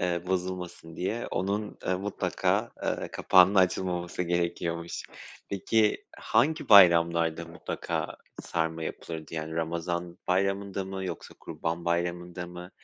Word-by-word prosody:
eee, 85 -1 0
bozulmasın 90 -3 -3
diye 110 +6 -2
onun, 100 +2 -2
ııı, 90 0 +1
mutlaka, 100 +1 0
ııı, - - -1
kapağının 95 +2 +5
açılmaması 90 -2 +1
gerekiyormuş. 85 -1 -2 0.5
Peki 105 +2 +1
hangi 145 +9 +1
bayramlarda 85 -4 +6
mutlaka - - -4 0.3
sarma 80 -1 -2
yapılırdı? 80 0 -6
Yani, 80 0 -4
Ramazan 85 +1 -2
Bayramı'nda 100 +1 0
mı 95 0 -5
yoksa - - -6
Kurban 85 +1 -4
Bayramı'nda 85 +1 -2
mı? 90 +1 -9
90 Hz, 110 wpm, -28 LUFS, 85-95 Hz, 0.5 s, bayramlarda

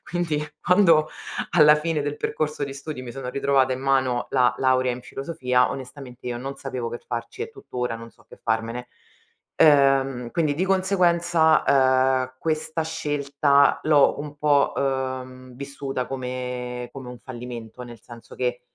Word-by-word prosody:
quindi 165 -4 -2 0.2
quando 170 -5 +4 0.4
alla 150 -2 +6
fine 155 -1 -1
del 145 0 -3
percorso 150 -1 -2
di 135 0 -7
studi 140 -2 -7
mi 120 -2 -8
sono 135 -2 -6
ritrovata 135 0 +2
in 130 - -4
mano 130 -3 +1
la 125 -2 +3
laurea 130 -1 +2
in 125 - -6
filosofia 130 -4 0
onestamente 130 -1 -9
io 120 -1 -3
non 135 +2 -6
sapevo 130 -4 -4
che 120 - -5
farci 120 - -6
e 455 - -6
tuttora 125 - -4
non 115 0 -11
so - - -25
che - - -13
farmene, 115 +2 -2 0.7
ehm, 135 -4 +4
quindi 155 -4 +1
di 180 +5 0
conseguenza, 175 -4 +3
ehm, 130 -1 +3
questa 160 0 -1
scelta 140 -2 +2
l'ho 150 -2 +4
un 145 0 -8
po', 145 -2 +3
ehm, 130 -2 -3
vissuta 140 -1 -4
come 125 -1 -5
come 130 -2 -9
un 125 -1 -9
fallimento, 120 -2 -9
nel 120 -2 -10
senso 115 0 -13
che, 125 -1 -2
135 Hz, 155 wpm, -24 LUFS, 125-150 Hz, 0.7 s, alla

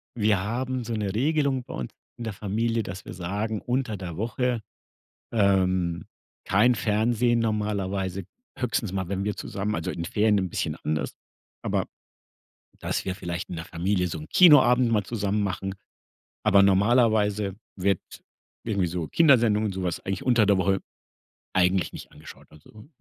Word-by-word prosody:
wir 105 -3 +2
haben 125 +4 -2
so 115 0 -4
'ne 105 -3 -2
Regelung 140 +1 +1
bei 130 - -10
uns 65 - -5 0.3
in 120 - -6
der 110 - -4
Familie, 110 +4 -1
dass 90 -1 -8
wir - - -7
sagen: 100 +4 -3
Unter 125 -4 -1
der 90 -3 -7
Woche 120 +2 -1 0.7
ähm, 95 -5 +1 0.4
kein 120 +6 +4
Fernsehen 115 +2 +1
normalerweise, 100 -4 -1 0.3
höchstens 115 -5 -1
mal, 95 -2 -2
wenn 100 0 -2
wir 105 -1 -2
zusammen 100 +2 -3
also, 80 -1 -2
in 85 0 -4
Ferien 105 0 +2
'n 95 -1 -1
bisschen - - -2
anders, 75 -1 -2 0.5
aber, - - -1 0.9
dass - - -2
wir 95 - -1
vielleicht 85 -1 -5
in 90 - -5
der 80 - -6
Familie 90 +2 0
so 80 - -5
'n 75 - -9
Kinoabend 130 -8 +6
mal 105 -2 +2
zusammen 105 0 -1
machen, 95 0 -3 0.7
aber 100 -2 +6
normalerweise 105 -1 +3 0.2
wird, 95 -1 +1 0.6
irgendwie 100 -5 0
so 85 -1 -3
Kindersendungen 115 -9 +4
und 95 - -3
sowas 90 -2 -2
eigentlich 95 0 -4
unter 120 -4 +4
der 100 -1 +4
Woche, 95 +1 +2 0.8
eigentlich 90 -1 +2
nicht - - -10
angeschaut. 75 +1 -13
Also 105 - -16
105 Hz, 155 wpm, -26 LUFS, 95-115 Hz, 0.9 s, Kinoabend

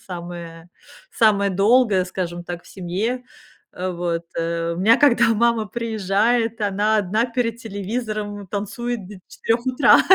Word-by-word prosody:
самое 170 -2 -8 0.4
самое 200 -3 +3
долгое, 200 0 +3
скажем 175 -1 -4
так, 175 -1 -6
в - - -16
семье. 200 +7 -3 0.5
Э, 185 +1 -3
вот, 170 -1 -2
э, 165 0 -1
у - - -6
меня, 220 +4 +6
когда 275 -5 +5
мама 235 0 +2
приезжает, 225 +1 0
она 205 +2 +1
одна 215 +5 +1
перед 235 -1 -2
телевизором 210 -2 -4
танцует 210 +1 -4
до 210 - -10
4 235 +2 -1
утра 255 +3 +6
205 Hz, 135 wpm, -22 LUFS, 180-230 Hz, 0.5 s, меня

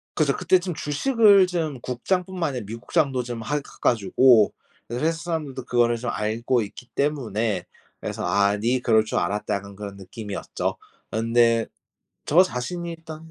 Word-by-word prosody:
그죠. 145 -3 +2
그때 185 - +3
좀 180 -1 -4
주식을 200 - +4
좀 160 -7 -2
국장 155 +9 -1
뿐만 180 -5 -2
아니라 125 -6 -5
미국장도 130 +3 0
좀 120 -1 -5
하 135 +6 -2
해 145 - 0 0.2
가지고 115 0 +4 0.4
회사 155 +7 +1
사람들도 155 -7 -4
그거를 120 -1 +2
좀 125 +1 -4
알고 115 +3 0
있기 120 +4 -10
때문에 115 -9 -1 0.4
그래서 - - -4
'아, 100 +3 +2
네 120 +4 +1
그럴 110 -2 +3
줄 - - -2
알았다.' 105 +4 -1
약간 100 0 -7
그런 100 -1 -7
느낌이었죠. 100 +1 -5 0.3
그런데 115 0 +2 0.6
저 170 +5 +6
자신이 170 +3 -3
일단 160 0 -10
125 Hz, 325 characters per minute, -24 LUFS, 110-160 Hz, 0.6 s, 저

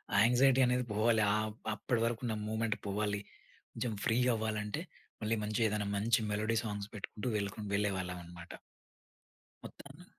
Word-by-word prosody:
ఆ - - +5
యాంక్సైటీ 130 +3 +5
అనేది 125 0 +2
పోవాలి. 110 +2 +3
ఆహ్, 110 0 0 0.2
అప్పటి 115 +3 -1
వరకు 115 -1 -1
ఉన్న 115 - 0
మూవ్మెంట్ 110 0 0
పోవాలి. 105 +1 0 0.5
కొంచెం 120 -3 -2
ఫ్రీ 115 0 +3 0.2
అవ్వాలంటే 110 +4 -2 0.4
మళ్ళీ 110 +1 +1
మంచిగ 110 +2 +1
ఏదైనా 105 -1 -1
మంచి 115 +5 +3
మెలోడీ 110 +2 +1
సాంగ్స్ 105 -2 -4
పెట్టుకుంటూ 105 +3 -5
వెల్‌‌‌క 100 -1 -2 0.2
వెళ్ళేవాళ్ళం 95 -3 0
అన్నమాట. 85 0 -11 1.1
మొత్తాన్ని - - -12
110 Hz, 140 wpm, -33 LUFS, 105-115 Hz, 1.1 s, ఆ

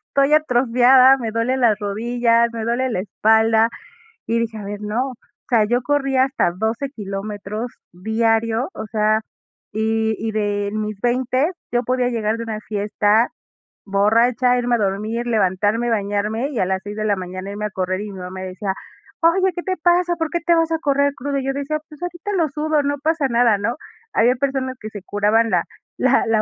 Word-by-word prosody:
estoy 275 +2 +3
atrofiada, 255 -2 +5
me 235 -4 -4
duelen 240 +4 0
las 220 -3 +4
rodillas, 235 +3 +1
me 225 -1 -4
duele 245 +3 0
la 225 - -2
espalda", 220 +3 +3 0.6
y 230 0 +1
dije: 225 -1 -3
"A 205 - -7
ver 205 +1 -6
no", 230 +6 -2
o - - -12 0.3
sea 230 -4 +4
yo 240 +3 +1
corría 270 -1 +2
hasta 265 -10 0
12 220 +9 -2
kilómetros 210 0 -5 0.2
diario, 225 +5 0
o - - -6
sea, 215 0 +1 0.5
y 220 +1 0
y 220 0 -2
de 205 -1 -1
mis 215 -1 -3
20 255 +5 +1 0.2
yo 240 0 +1
podía 250 0 0
llegar 220 -2 -1
de 230 - -4
una 220 -2 -4
fiesta, 210 +2 +1 0.6
borracha, 230 +5 +3
irme 245 0 +1
a - - +1
dormir, 215 +3 -2
levantarme, 210 +2 +1
bañarme 210 +3 -1
y 245 - -3
a - - +2
las 190 0 -1
6 205 0 -7
de 215 - -3
la 205 -2 +1
mañana 185 +1 -6
irme 210 +1 -4
a - - -2
correr 185 0 -2
y 210 0 -6
mi 190 - -9
mamá 185 +1 -7
decía: 190 +1 -3 0.5
"Oye, 370 +3 +3
¿qué 350 - -4
te 370 -1 -2
pasa? 350 +1 +2
¿Por 325 -1 -1
qué 345 - -1
te 345 - +4
vas 330 0 +1
a 325 - 0
correr 280 -2 +1
cruda?" 275 +1 -2
Y 265 - -6
yo 270 - 0
decía: 285 +2 -2
"Pues 300 -2 -14
ahorita 355 +3 -5
lo 335 -5 +1
sudo, 300 +1 0
no 285 0 -1
pasa 315 -2 +1
nada", 235 -3 +3
¿no? 230 +6 -2 0.4
Había 245 +3 +4
personas 265 -1 -2
que 215 - -7
se 205 -2 -8
curaban 210 +3 +2
la - - +2 0.3
la - - +3
la 225 -1 +3
230 Hz, 195 wpm, -20 LUFS, 210-265 Hz, 0.6 s, atrofiada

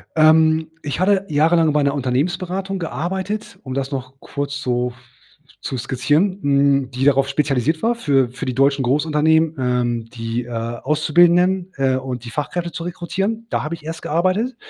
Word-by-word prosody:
Ähm, 160 0 +4
ich 145 +3 -3
hatte 195 +1 +2
jahrelang 160 +1 +3
bei 150 - +2
'ner 140 0 +1
Unternehmensberatung 175 +9 -2
gearbeitet, 190 +5 -4
um 130 -2 -6
das 135 +1 -3
noch 130 -2 -5
kurz 140 0 -5
so 125 -1 -1 0.7
zu 130 - -4
skizzieren, 145 - 0
hm, 140 -2 +2
die 130 +1 -3
darauf 135 -1 +4
spezialisiert 145 +1 0
war 230 +2 +3
für 140 - +2
für 125 +2 -6
die 130 - -2
deutschen 135 +1 +2
Großunternehmen, 155 +4 +2
ähm, 120 -2 0
die, 115 0 -3
äh, 120 - -11
Auszubildenden, 170 +10 +2
äh, 135 -1 +2
und 125 -2 -5
die 115 - -7
Fachkräfte 170 +5 -3
zu 165 +1 -6
rekrutieren. 195 +6 -3
Da - - -1
habe 155 +2 -3
ich 165 - -17
erst 165 +1 -6
gearbeitet 185 +10 0
150 Hz, 165 wpm, -20 LUFS, 130-175 Hz, 0.7 s, Ähm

